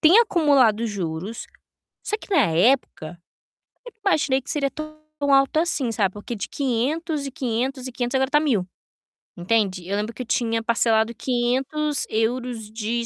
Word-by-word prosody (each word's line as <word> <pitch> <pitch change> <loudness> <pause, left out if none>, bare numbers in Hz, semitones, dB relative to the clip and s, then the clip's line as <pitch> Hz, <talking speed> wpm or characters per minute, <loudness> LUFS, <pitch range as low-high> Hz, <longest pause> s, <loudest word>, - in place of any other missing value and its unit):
tem 350 +7 +7
acumulado 280 - +3
juros, 190 +1 -4 0.6
só 425 - -1
que 410 - -7
na 290 - +5
época, 175 -3 +1 0.7
eu 485 - -9
imaginei 280 -8 +2
que - - -8
seria 285 -4 0
tão 310 0 -7 0.4
alto 275 +3 +3
assim, 310 -7 0
sabe, 195 -4 +1
porque 210 +3 -6
de 200 - -5
500 280 +4 -1
e - - -4
500 260 -1 -2
e 255 - -6
500 245 +1 -3
agora 265 0 +2
está 295 +1 +3
1000, 230 -12 +1 0.7
entende. 185 -1 0
Eu 200 - -1
lembro 215 +3 -3
que 255 - -7
eu - - -13
tinha 230 -2 0
parcelado 230 -1 +2
500 265 +5 0
euros 225 0 -2
de 230 +2 -2
245 Hz, 160 wpm, -23 LUFS, 220-280 Hz, 0.7 s, tem